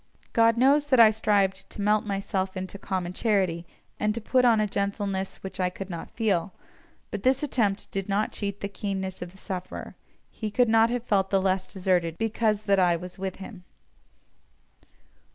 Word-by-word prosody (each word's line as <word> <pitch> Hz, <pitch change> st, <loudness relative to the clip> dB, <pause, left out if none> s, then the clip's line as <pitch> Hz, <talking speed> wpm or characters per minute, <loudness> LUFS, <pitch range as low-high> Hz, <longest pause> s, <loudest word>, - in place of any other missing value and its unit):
God 230 Hz, 0 st, +4 dB
knows 280 Hz, +4 st, +4 dB
that 260 Hz, -3 st, +4 dB
I 220 Hz, -2 st, +9 dB
strived 200 Hz, -3 st, +1 dB
to -, -, -9 dB
melt 210 Hz, +1 st, +2 dB
myself 195 Hz, -1 st, -2 dB
into 185 Hz, +1 st, -6 dB
common 185 Hz, -3 st, -3 dB
charity, 185 Hz, -6 st, 0 dB, 0.3 s
and 210 Hz, 0 st, +1 dB
to -, -, -2 dB
put 250 Hz, +3 st, +2 dB
on 230 Hz, -3 st, +5 dB
a 215 Hz, -, +2 dB
gentleness 200 Hz, -1 st, -2 dB
which 190 Hz, +1 st, -7 dB
I 180 Hz, -1 st, +2 dB
could 190 Hz, +1 st, -8 dB
not 170 Hz, -, -6 dB
feel, 200 Hz, -4 st, -1 dB, 0.6 s
but 205 Hz, -, -4 dB
this 260 Hz, +4 st, +2 dB
attempt 215 Hz, -8 st, 0 dB
did 195 Hz, +1 st, -3 dB
not 205 Hz, +2 st, +1 dB
cheat 200 Hz, -1 st, -4 dB
the 200 Hz, -, -2 dB
keenness 195 Hz, -2 st, -4 dB
of 175 Hz, 0 st, -6 dB
the 190 Hz, -, -18 dB
sufferer; 185 Hz, -1 st, -6 dB, 0.4 s
he 215 Hz, -, -4 dB
could 240 Hz, +3 st, +2 dB
not 225 Hz, +1 st, +5 dB
have 245 Hz, -1 st, -2 dB
felt 195 Hz, -4 st, +1 dB
the 195 Hz, -, +3 dB
less 190 Hz, 0 st, 0 dB
deserted 180 Hz, -3 st, 0 dB
because 220 Hz, -1 st, 0 dB
that 200 Hz, -2 st, +3 dB
I 175 Hz, -2 st, +4 dB
was 180 Hz, +2 st, -8 dB
with 190 Hz, -1 st, -3 dB
him. 195 Hz, -1 st, -10 dB
200 Hz, 185 wpm, -26 LUFS, 190-220 Hz, 0.6 s, I